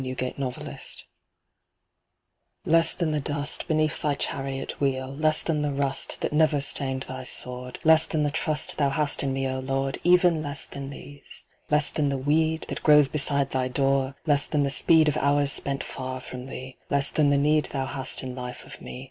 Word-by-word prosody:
"Less 130 - -5
than 130 +2 -4
the 125 -2 -4
Dust" - - -5 1.6
Less 165 0 +3
than 170 -4 -1
the 150 - 0
dust, 145 +1 0
beneath 155 -1 0
thy 145 -1 0
Chariot 135 -1 -4
wheel, 130 -1 -1
Less 155 +1 +1
than 155 -3 -1
the 145 -1 -1
rust, 140 -1 -2
that - - -2
never 155 -1 +3
stained 135 -1 -2
thy 130 0 -7
Sword, 125 0 -1
Less 160 0 +5
than 155 -1 -1
the 145 - 0
trust 155 0 -1
thou 140 -2 +3
hast 150 +1 0
in 140 - -1
me, 135 0 -1
O 130 0 -3
Lord, 135 +1 -2
Even 175 -2 +4
less 145 -1 +1
than 140 -1 -7
these! 140 0 -10 0.3
Less 150 -1 +2
than 145 -2 0
the 140 - -1
weed, 155 +4 +1
that - - -5
grows 150 -2 +5
beside 140 -2 +1
thy 130 -1 0
door, 135 +1 0
Less 145 -3 +2
than 150 -2 +1
the 140 - 0
speed 160 +2 +4
of 150 0 +1
hours 145 0 +2
spent 140 0 -1
far 130 0 -6
from 125 0 -9
thee, 130 -1 -8
Less 140 -1 +3
than 150 -2 +2
the 145 - +3
need 150 +2 +2
thou 135 -2 -3
hast 135 0 +1
in 130 -1 -5
life 125 -1 -7
of - - -12
me. - - -8
140 Hz, 200 wpm, -25 LUFS, 135-150 Hz, 1.6 s, Less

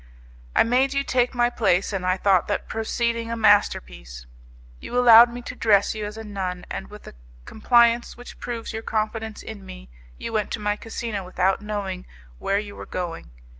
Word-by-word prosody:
I - - +6
made 260 +4 +1
you 275 - +1
take 250 -1 0
my 240 0 +2
place, 200 -4 +1
and 190 -2 -2
I 185 +1 +2
thought 190 -2 +2
that 205 - -2
proceeding 230 +1 -2
a 230 - -3
masterpiece. 60 - +1 0.5
You 245 - -5
allowed 235 -1 +8
me 245 0 -8
to 255 - -6
dress 205 -4 +3
you 215 -1 -4
as 210 +1 -9
a 225 - -7
nun, 190 -4 -5
and 190 - -5
with 210 0 -12
a - - -11 0.3
compliance 235 +1 +2
which 245 - -12
proves 235 -1 -5
your 220 - -4
confidence 220 0 -3
in 215 -3 -9
me - - -11 0.3
you - - -6
went 215 -1 0
to - - -3
my 205 0 0
casino 225 -2 -5
without 185 +2 0
knowing 200 -3 -5 0.3
where 200 - 0
you 205 0 -5
were - - -9
going. 175 - -5
215 Hz, 190 wpm, -24 LUFS, 195-235 Hz, 0.5 s, allowed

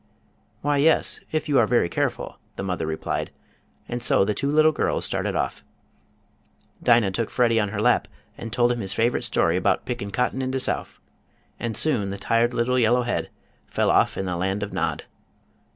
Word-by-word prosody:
"Why, 145 0 +1
yes, 155 +3 +3
if 155 0 -1
you 145 -3 +3
are 115 - +3
very 120 -6 +2
careful," - - -3 0.2
the - - -5
mother 90 -4 -2
replied, 80 0 -3 0.6
and 120 0 -4
so 95 - +3
the 105 - 0
two 140 +6 -2
little 155 +1 +5
girls - - -1
started - - -2
off. - - -2 1.2
Dinah 115 -5 +4
took 115 +3 -2
Freddie 115 -2 +2
on 105 -2 0
her 100 0 -4
lap 120 +3 +2 0.3
and 115 0 -7
told 120 +1 +2
him 120 - -2
his 95 -3 -3
favorite 120 +2 +1
story - - +1
about - - +1
"Pickin' 120 -5 -4
cotton 125 +5 -1
in 130 - -2
de 130 0 -1
Souf," - - -3 0.6
and 115 -3 -3
soon 120 -10 +1
the 100 - -5
tired 115 +4 +1
little 125 +1 +1
yellow 120 +1 +3
head 120 - -2 0.4
fell - - +1
off - - +2
in 95 - -2
the 90 -2 -2
land 95 +3 -1
of 105 - -6
Nod. - - -2
120 Hz, 190 wpm, -24 LUFS, 100-125 Hz, 1.2 s, little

